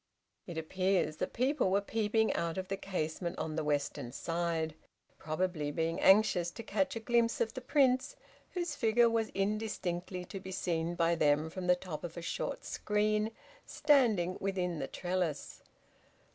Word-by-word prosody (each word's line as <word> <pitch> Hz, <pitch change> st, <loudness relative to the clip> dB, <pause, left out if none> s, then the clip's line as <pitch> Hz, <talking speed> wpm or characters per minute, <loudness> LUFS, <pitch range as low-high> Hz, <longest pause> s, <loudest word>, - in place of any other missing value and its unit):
It 170 Hz, -3 st, -6 dB
appears 185 Hz, 0 st, 0 dB
that -, -, -2 dB
people 260 Hz, -3 st, +1 dB
were 195 Hz, +2 st, +3 dB
peeping 220 Hz, +1 st, +1 dB
out 170 Hz, 0 st, -2 dB
of 185 Hz, 0 st, -4 dB
the 195 Hz, -, 0 dB
casement 175 Hz, -2 st, -3 dB
on 155 Hz, -1 st, -3 dB
the 160 Hz, -, -1 dB
western 145 Hz, -4 st, -1 dB
side, 165 Hz, +1 st, -1 dB, 0.5 s
probably 155 Hz, -1 st, -1 dB
being 165 Hz, +2 st, -1 dB
anxious 190 Hz, -3 st, +5 dB
to 230 Hz, -, -9 dB
catch 200 Hz, -1 st, 0 dB
a -, -, -2 dB
glimpse 235 Hz, 0 st, +2 dB
of 225 Hz, -1 st, 0 dB
the 255 Hz, -, -6 dB
Prince, 260 Hz, -, +2 dB, 0.4 s
whose 345 Hz, -4 st, -2 dB
figure 230 Hz, -1 st, +4 dB
was 225 Hz, -1 st, +1 dB
indistinctly 195 Hz, -3 st, -2 dB
to 195 Hz, -, -7 dB
be 190 Hz, 0 st, -8 dB
seen 170 Hz, -2 st, -1 dB
by 170 Hz, -1 st, +3 dB
them 150 Hz, 0 st, +2 dB
from 185 Hz, 0 st, -5 dB
the 180 Hz, -, +6 dB
top 170 Hz, -4 st, -7 dB
of 175 Hz, -1 st, -6 dB
a -, -, -4 dB
short -, -, -3 dB
screen 210 Hz, +1 st, 0 dB, 0.3 s
standing 225 Hz, -, +3 dB
within 180 Hz, -4 st, -1 dB
the -, -, -2 dB
trellis. 175 Hz, -5 st, -3 dB
185 Hz, 160 wpm, -33 LUFS, 165-220 Hz, 0.5 s, the